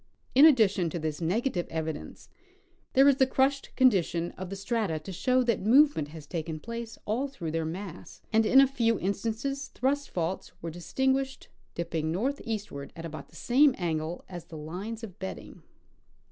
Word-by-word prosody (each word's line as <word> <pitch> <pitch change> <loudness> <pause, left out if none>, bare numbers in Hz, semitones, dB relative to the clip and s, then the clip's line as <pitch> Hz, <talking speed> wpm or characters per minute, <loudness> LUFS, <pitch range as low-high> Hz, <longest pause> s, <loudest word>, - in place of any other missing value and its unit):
In 280 +5 +9
addition 205 - +4
to 165 - -4
this 155 -2 -3
nega 215 +10 0
tive 175 -2 -2
evidence, 160 -2 -5 0.7
there 270 +2 +6
is 280 -2 +5
the 265 - +4
crushed 270 +1 +1
condition 175 -9 +3
of 185 -1 -7
the 195 - -4
strata 195 -4 -1
to 155 +5 -8
show 255 +7 +2
that 235 -4 +1
movement 245 - +5
has 155 0 -10
taken 160 0 -4
place 230 +3 -6
all 240 +7 0
through 175 - -6
their 165 0 -1
mass; 180 +1 -7
and 220 +1 +5
in 255 +5 +6
a 275 - +8
few 230 -4 +1
instances 225 +8 -2
thrust 280 +2 -1
faults 175 +1 -3
Avere 165 - -3
distinguished, 265 +11 -1 0.3
dipping 165 -2 -2
north 255 +11 -1
eastward 205 -11 -5
at 165 - -7
about 155 -3 -7
the - - -20
same 270 +2 +4
angle 165 -1 -2
as 175 -3 -8
the 160 - -10
lines 190 +9 -6
of 195 -6 -9
bedding. 90 -5 -7
200 Hz, 175 wpm, -29 LUFS, 165-255 Hz, 0.7 s, In